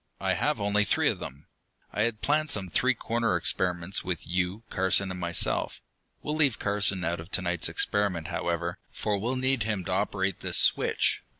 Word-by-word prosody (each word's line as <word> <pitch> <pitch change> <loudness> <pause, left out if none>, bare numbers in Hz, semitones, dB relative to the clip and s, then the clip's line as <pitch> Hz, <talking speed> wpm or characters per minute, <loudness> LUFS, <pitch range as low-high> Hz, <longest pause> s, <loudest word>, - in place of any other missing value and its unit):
"I - - 0
have - - 0
only 100 +1 +1
three - - +2
of - - -3
them; 70 +2 -9 0.5
I 105 - -1
had 110 -1 -1
planned 155 +1 +1
some 100 -7 +3
three 130 +4 +2
cornered 115 -3 -1
experiments 90 +1 +1
with 90 -2 -4
you, 90 +5 -2
Carson, 95 +1 +1
and 90 - -6
myself. 85 -1 0 0.4
We'll 150 - -3
leave 145 -7 +2
Carson 100 -2 0
out 85 +1 -2
of 80 +2 -10
to 95 - +3
night's 90 -1 +1
experiment, 95 -6 0
however, 85 0 -3
for 105 - -2
we'll 120 +6 -2
need 130 -1 +1
him 105 -4 -2
to - - -4
operate 95 -1 -1
this - - -1
switch. - - +3
95 Hz, 185 wpm, -27 LUFS, 90-110 Hz, 0.5 s, some